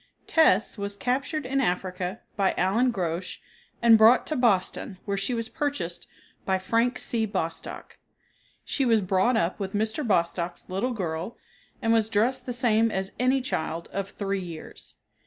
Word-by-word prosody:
"Tess" 225 - +3
was 200 0 -3
captured 260 +6 -1
in 270 +2 0
Africa 185 -1 -2
by 195 -2 +1
Allan 225 +8 +2
Grosch 180 -3 -3 0.5
and 225 -2 +7
brought 225 +3 +6
to 310 - -2
Boston, 200 -5 +1
where 200 - -1
she 200 +5 -1
was 230 -1 -2
purchased 285 - -3 0.4
by 190 -1 +1
Frank 230 +6 +1
C. 225 -2 -1
Bostock. 165 -5 -5 0.7
She 275 - 0
was 230 -3 +4
brought 190 +6 +2
up 185 -2 0
with 195 -1 -4
Mr. 220 +7 0
Bostock's 175 -5 0
little 210 +8 -1
girl 175 0 -4 0.5
and 225 0 +3
was 220 -1 +2
dressed 230 +6 0
the - - -1
same 230 -2 +2
as 190 -2 -2
any 255 +2 +3
child 170 - -3
of 195 0 -3
three 195 -1 -3
years. 170 -3 -9
210 Hz, 155 wpm, -26 LUFS, 185-245 Hz, 0.7 s, and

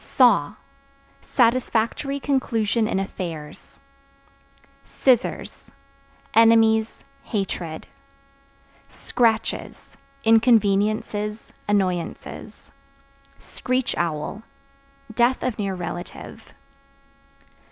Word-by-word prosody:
Saw 230 - +3 0.7
Satisfactory 250 +2 +1
conclusion 230 -5 0
in 195 - 0
affairs. 165 -6 -7 1.1
Scissors 255 -2 0 0.6
Enemies, 225 -1 +4 0.2
hatred. 180 -7 -3 1.0
Scratches 225 -2 -1 0.3
Inconveniences, 215 -1 +2
annoyances. 185 -4 -3 0.7
Screech 255 0 -2
Owl 170 +5 -2 0.7
Death 240 +3 +2
of 250 -4 -2
near 195 -2 -1
relative. 175 0 -8
220 Hz, 60 wpm, -23 LUFS, 195-235 Hz, 1.1 s, Enemies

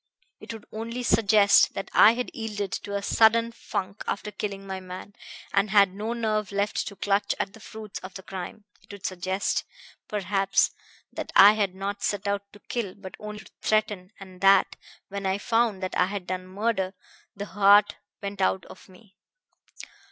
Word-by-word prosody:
It - - -8
would 225 -2 -9
only 230 +3 -5
suggest 210 -3 +5
that 195 - -5
I 215 - +8
had 250 +1 -3
yielded 205 -3 -4
to 200 - -4
a 200 - -2
sudden 230 +2 +4
funk 195 -3 -5
after 210 +1 -3
killing 200 -1 -5
my 190 -1 -5
man, 185 +2 -9 0.4
and 200 +1 +2
had 200 -2 +5
no 215 +4 -3
nerve 215 -3 -1
left 200 +1 -1
to 200 - -7
clutch 200 +1 0
at 195 - -2
the 220 - -13
fruits 215 -1 -8
of 185 - -10
the 190 - -8
crime; 195 +3 -7 0.2
it - - -15
would 200 -1 -10
suggest, 185 +1 -1 0.4
perhaps, 195 -1 +1 0.4
that - - -5
I 200 +2 +10
had 200 -4 -1
not 200 +1 -4
set 205 0 -1
out 200 0 -2
to 205 - -15
kill 225 -6 -4
but 190 -2 -10
only 210 0 -7
to - - -17
threaten, 210 -3 0
and 185 -2 -12
that, 195 0 +5 0.3
when 200 0 -3
I 190 +1 +1
found 225 -2 +1
that 185 - -3
I 180 - +3
had 195 -1 -5
done 185 0 -4
murder, 195 -1 -1 0.4
the 200 0 -5
heart 205 +1 +5 0.3
went 200 -1 -4
out 190 -1 +1
of 185 - -14
me. 190 +1 -20
200 Hz, 180 wpm, -26 LUFS, 190-215 Hz, 0.4 s, I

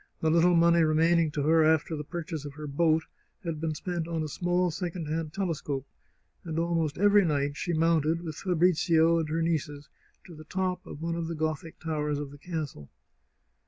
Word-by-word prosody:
The 160 - +1
little 170 +2 +4
money 170 0 +5
re 155 -1 +3
maining 165 0 +3
to 145 - -1
her 160 +2 +4
after 160 +1 +2
the 150 - -4
purchase 160 -1 -5
of 145 -1 -8
her 150 0 -7
boat 160 +2 +2 0.4
had 165 -3 -4
been 160 -1 -1
spent 170 0 -3
on 165 -2 -2
a - - -3
small 175 +3 0
second 175 0 -4
hand 155 0 -2
telescope, 155 -7 -3 0.6
and 165 -2 -5
almost 165 -3 0
every 205 +1 +5
night 145 -3 0
she 175 +4 -2
mounted, 165 0 +2
with 160 -2 -5
Fabrizio 170 -2 +3
and 160 -2 -2
her 165 +1 0
nieces, 150 -3 -2 0.4
to 180 - -12
the 155 0 -12
top 185 +2 -2
of 150 - -8
one 165 0 -1
of 165 -1 -3
the 165 - -4
Gothic 155 0 -3
towers 150 -3 -2
of 145 -1 -5
the 145 - -13
castle. 150 - -5
160 Hz, 195 wpm, -28 LUFS, 155-170 Hz, 0.6 s, money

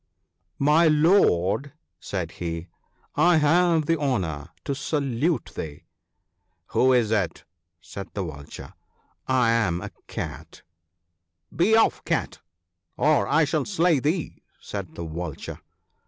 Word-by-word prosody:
" - - -49 0.2
My 165 +2 +6
lord," 145 - +3 0.3
said 85 -4 -4
he, 85 0 -4 0.2
" - - -38 0.2
I - - +5
have 165 +1 +3
the 165 +1 +1
honour 90 - -2 0.2
to 140 - -1
salute 140 +2 -1
thee." 75 -2 -6 0.4
" - - -50
Who 130 +1 +4
is 120 -4 +3
it? 100 -7 -1 0.2
" 85 - -55
said 100 +1 -8
the 100 - -1
Vulture. 70 -4 -9 0.4
" - - -43 0.2
I 115 - +4
am 105 -7 +1
a 100 +2 -7 0.2
Cat." - - -7 0.5
" 85 0 -29
Be 200 +6 +4
off, 225 - +3
Cat, - - -2 0.6
or 150 -1 +3
I 160 +2 +4
shall 155 -1 -1
slay 175 -6 +2
thee," 155 +5 -2 0.2
said 95 -6 -7
the 85 - -5
Vulture. 80 -1 -6
115 Hz, 140 wpm, -25 LUFS, -, 0.6 s, My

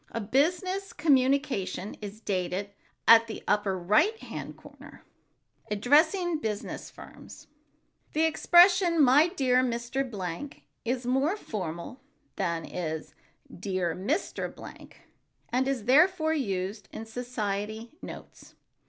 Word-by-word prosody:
A - - -4
business 360 - 0
communication 270 - +1
is 210 +1 -8
dated 190 0 -2 0.4
at 230 0 +8
the 220 - -7
upper 205 -2 +1
right 215 - +2
hand - - -8
corner. - - -15 0.7
[Sidenote: - - -21
ADDRESSING 315 - +3
BUSINESS 215 -4 -4
FIRMS] - - -13 0.7
The 315 - +2
expression 345 +2 +5
"My 280 +5 +6
dear 260 -8 +2
Mr. 240 +2 -1
Blank" 195 +5 -6 0.2
is 245 +1 -2
more 270 - +1
formal 185 - -6 0.3
than 170 -4 -2
is 160 -3 -5 0.4
"Dear 185 -3 -2
Mr. 270 - -2
Blank," - - -13 0.5
and 255 +2 +1
is, 270 -5 -1
therefore, 315 +4 +4
used 200 -6 -3
in 225 - -7
society 220 0 -4
notes. - - -11
245 Hz, 115 wpm, -28 LUFS, 200-305 Hz, 0.7 s, at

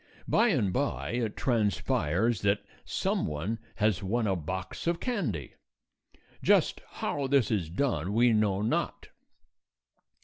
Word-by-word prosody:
By 235 - +4
and 120 - +1
by 140 +1 -1
it 115 -3 -2
transpires 105 - +1
that 100 0 +1 0.2
some - - -1
one 85 +10 -3 0.2
has 105 -3 +1
won 110 +4 0
a 95 -2 +1
box 90 - -5
of 170 0 +1
candy. 140 - -2 0.9
Just - - +3
how 140 -2 -2
this 135 -4 +3
is 95 -7 0
done 95 - -1
we 120 +2 +4
know 105 -2 +2
not. 110 - -1
110 Hz, 130 wpm, -29 LUFS, 95-125 Hz, 0.9 s, By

